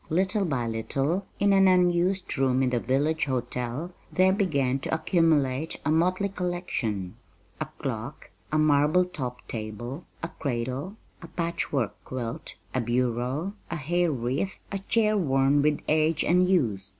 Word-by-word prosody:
Little 190 +5 +1
by 135 -8 -1
little, 135 - -1
in 200 0 +4
an 195 0 +6
unused 180 +1 +2
room 135 -2 +2
in 125 - +1
the 120 - +1
village 150 +6 +1
hotel 125 +4 -3 0.2
there 185 0 +4
began 140 - +1
to - - -5
accumulate 160 -4 +1
a 155 - +2
motley 185 +5 +2
collection 175 - -3 0.4
a - - -2
clock, - - -5 0.2
a 155 - +2
marble 155 +3 +4
topped 130 -8 -6
table, 120 - -6 0.2
a 165 - -2
cradle, 130 - -3 0.3
a 170 - -9
patchwork 150 - -2
quilt, 125 +3 -5 0.2
a 130 - +1
bureau, 125 - -1 0.2
a 170 - -2
hair 170 +3 +1
wreath, 135 +8 -2 0.2
a 200 - -2
chair 215 +2 +2
worn 140 -5 +3
with 150 0 +2
age 155 +1 +2
and 180 +1 +3
use. 110 - +1
150 Hz, 145 wpm, -27 LUFS, 125-180 Hz, 0.4 s, an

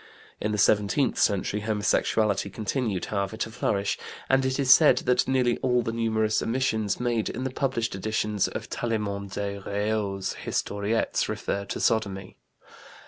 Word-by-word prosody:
In 105 - -1
the 105 - -1
seventeenth 105 +6 +2
century, 100 0 +1
homosexuality 105 0 +1
continued, 105 -1 -2
however, 100 +1 -2
to 110 - -3
flourish, 100 -2 -1 0.3
and 135 0 +4
it 130 +1 -1
is 130 -2 +7
said 145 -5 +6
that 125 0 +2
nearly 125 -2 +2
all 125 -2 +2
the 115 - -2
numerous 110 -1 +1
omissions 115 -4 0
made 120 -3 0
in 125 - -4
the 130 - -2
published 120 -4 -1
editions 105 +1 0
of - - -6
Tallement 100 -4 -3
des 100 0 -3
Reaux's 100 -1 -2
Historiettes 100 +3 -1
refer 100 0 -2
to 100 - -5
sodomy. 100 -4 0
110 Hz, 145 wpm, -26 LUFS, 100-120 Hz, 0.3 s, is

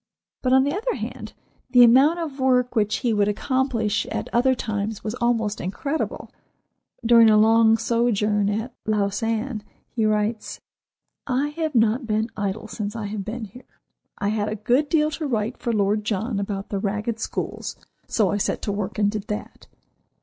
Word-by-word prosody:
But, 255 - 0
on 265 0 +6
the 285 +1 0
other 465 +5 -1
hand, - - -6 0.4
the 250 -1 +7
amount 265 +8 +6
of 305 -5 -5
work 250 -1 +2
which 215 -1 +2
he 235 - +3
would 205 -1 +2
accomplish 230 -1 0
at - - -4
other 260 +2 +3
times 210 -2 -3
was 215 - -3
almost 225 -3 0
incredible. 280 - -3 0.7
During 230 -1 +7
a 215 - +5
long 225 +1 +5
sojourn 215 -3 +1
at 220 +4 -3
Lausanne 215 +3 -1 0.3
he 220 -2 +1
writes: 215 +1 -1 0.7
"I 270 +2 0
have 310 -1 -3
not 230 +2 +2
been 220 +1 0
idle 205 +1 -3
since 210 0 -5
I 220 -2 -4
have 205 0 -4
been 220 +3 -5
here. 230 +6 -16 0.4
I 200 - -1
had 210 -1 -1
a 215 - -3
good 245 +8 +1
deal 305 -1 +2
to 310 0 -3
write 230 -1 -2
for 235 - -2
Lord 210 0 +1
John 210 +1 -2
about 200 -1 -4
the 200 - -2
ragged 210 +3 -2
schools; - - -4 0.3
so 210 -5 +1
I 205 - 0
set 205 - -2
to 205 - -1
work 200 -1 -4
and 205 -1 +2
did 210 -1 -5
that. 210 - -6
220 Hz, 175 wpm, -23 LUFS, 210-250 Hz, 0.7 s, the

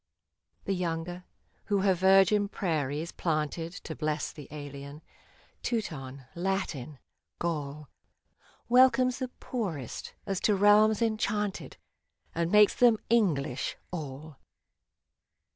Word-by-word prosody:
The 195 - 0
younger, 175 0 -3 0.4
who 200 -2 +1
her 190 -1 +4
virgin 195 +3 +4
prairies 155 -4 -2
planted 165 0 -2
To 160 - -6
bless 155 0 -2
the 145 -3 -11
alien 145 0 -8 0.3
— - - -32
Teuton, 140 - -4
Latin, 170 -7 -3 0.4
Gaul, 150 -3 -3 0.8
Welcomes 255 +1 +5
the 260 - -2
poorest, 195 - -5
as 195 -2 -1
to 210 - +2
realms 210 +2 +5
enchanted, 210 -2 -1 0.6
And 170 +1 -1
makes 210 -1 +6
them 240 -3 +5
English, 160 - +1
all 155 -2 -7
175 Hz, 105 wpm, -29 LUFS, 150-210 Hz, 0.8 s, makes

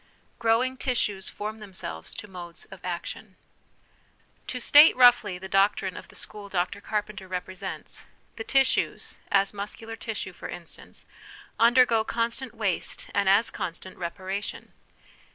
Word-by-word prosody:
Growing 240 +3 +2
Tissues 210 -7 -1
form 215 +1 -5
themselves 185 - -6
to 210 - -7
Modes 175 -3 -8
of 195 - -11
Action. 185 +3 -5 1.1
To 250 - -3
state 290 +5 +8
roughly 245 -7 +6
the 190 +1 -8
doctrine 195 -1 +2
of - - -9
the - - -16
school 205 -1 -8
Dr 185 +2 -1
Carpenter 210 -2 -3
represents 185 0 -5 0.3
the 225 - -5
tissues, 270 +2 +1
as 195 0 +4
muscu 205 +2 -6
lar 225 0 -6
tissue, 220 -4 -5
for - - -8
instance, 170 -2 -7 0.5
undergo 235 -1 +6
constant 235 +2 -1
waste 210 -5 -1
and 200 -1 +3
as 205 +4 +4
constant 180 +2 -5
reparation. 190 +3 -5
205 Hz, 135 wpm, -27 LUFS, 185-230 Hz, 1.1 s, state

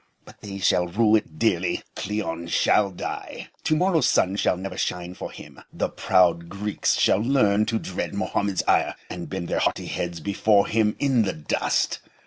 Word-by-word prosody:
But - - -16
they 100 -1 -7
shall 90 -2 +2
rue 105 +4 +3
it 90 -7 -2
dearly. 90 -3 0
Cleon 90 -5 -3
shall 100 +4 +3
die. 90 - -6 0.2
To 155 - +3
morrow's 165 -4 +2
sun 95 +1 +2
shall 95 - +1
never 95 0 -6
shine 90 -1 -3
for - - -7
him. - - -12
The - - -2
proud 85 -2 +2
Greeks 100 +2 -1
shall - - +3
learn 110 -4 +2
to 115 - 0
dread 95 -1 -4
Mohammed's 100 -1 -1
ire, - - +2 0.2
and 85 -1 -6
bend 95 -3 -4
their - - -1
haughty - - 0
heads 85 -1 -4
before 100 +3 +2
him 110 -1 +1
in 135 -4 +2
the 95 -3 0
dust. 75 - -1
100 Hz, 175 wpm, -24 LUFS, 90-110 Hz, 0.2 s, rue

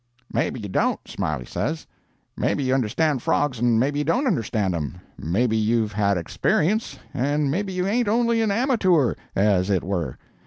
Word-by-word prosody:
"'Maybe - - 0
you 105 - -5
don't,' 95 - 0
Smiley 75 -5 -3
says. 155 - -3 0.5
'Maybe 140 - 0
you 130 0 +1
understand 135 +3 +1
frogs 130 -2 0
and 120 -1 +3
maybe 145 +4 +1
you - - +1
don't 245 - +1
understand 110 - 0
'em; 75 -6 -4 0.2
maybe 110 +8 0
you've 110 0 +1
had 100 -2 +1
experience, 175 - 0 0.2
and 145 +1 0
maybe 190 +5 -1
you 180 0 -1
ain't 230 +4 +1
only 230 +1 +2
a 220 - +1
amature, 200 - +2 0.2
as 95 -2 +2
it 95 -3 +1
were. 90 -4 -3
130 Hz, 165 wpm, -23 LUFS, -, 0.5 s, and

